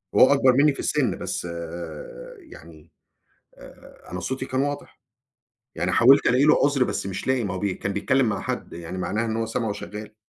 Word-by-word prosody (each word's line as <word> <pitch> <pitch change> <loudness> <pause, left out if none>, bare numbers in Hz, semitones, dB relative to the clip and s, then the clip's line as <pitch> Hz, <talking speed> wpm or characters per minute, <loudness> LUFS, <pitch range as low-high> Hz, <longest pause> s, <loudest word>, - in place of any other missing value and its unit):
هو 130 - +7
أكبر 130 -2 +4
مِنّي 140 +2 +4
في - - -12
السن - - 0
بس - - -4 0.9
يعني 85 - -15 0.7
آآ - - -16
أنا 90 - -4
صوتي 130 +6 -4
كان 130 0 -1
واضح. 145 0 -4 0.8
يعني - - -1
حاولت 135 +4 +6
ألاقي 125 +3 +3
له 150 - +5
عُذر، 140 -2 +2
بس - - -3
مش 95 +4 -5
لاقي 130 -2 +1
ما 100 -3 -3
هو 95 - -4
بي 100 -2 -1
كان 95 - -4
بيتكلّم 130 +4 +1
مع 100 - -2
حدّ، - - -5
يعني 85 +2 -7
معناها 105 +5 -1
إن 110 0 -2
هو 115 - -1
سمْعه 115 -1 -2
شغال. 105 +2 -8
115 Hz, 195 wpm, -24 LUFS, 100-135 Hz, 0.9 s, هو